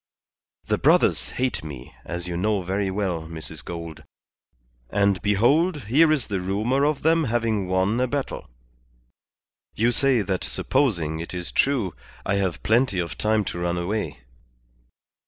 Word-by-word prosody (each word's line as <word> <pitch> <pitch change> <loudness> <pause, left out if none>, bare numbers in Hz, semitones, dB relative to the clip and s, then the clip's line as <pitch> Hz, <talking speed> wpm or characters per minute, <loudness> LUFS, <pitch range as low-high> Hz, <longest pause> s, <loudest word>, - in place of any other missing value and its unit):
The - - 0
brothers - - +3
hate 130 -7 -2
me, 65 -6 -9
as 85 +1 -5
you 85 - -3
know 100 +2 0
very 95 +2 -1
well, 95 -5 -2
Mrs. 80 -3 -8
Gould; 85 -2 -7 0.9
and 100 -2 +2
behold, 140 - +2
here 150 +9 +4
is 145 -7 +1
the 100 -3 -2
rumour 110 +9 0
of 150 -1 0
them 165 0 +3
having 110 -5 0
won 95 +5 +1
a 130 - +2
battle. 140 - -4 1.3
You 115 +3 +2
say 130 -3 +2
that 95 -4 -2
supposing 80 - 0
it 85 +2 -6
is 90 -1 -4
true, 120 - +1 0.3
I 100 - +1
have 95 -3 -1
plenty 115 -2 +2
of 85 -2 -2
time 110 -1 +1
to 85 - -4
run 85 0 -1
away." 85 - -3
100 Hz, 150 wpm, -24 LUFS, 85-120 Hz, 1.3 s, here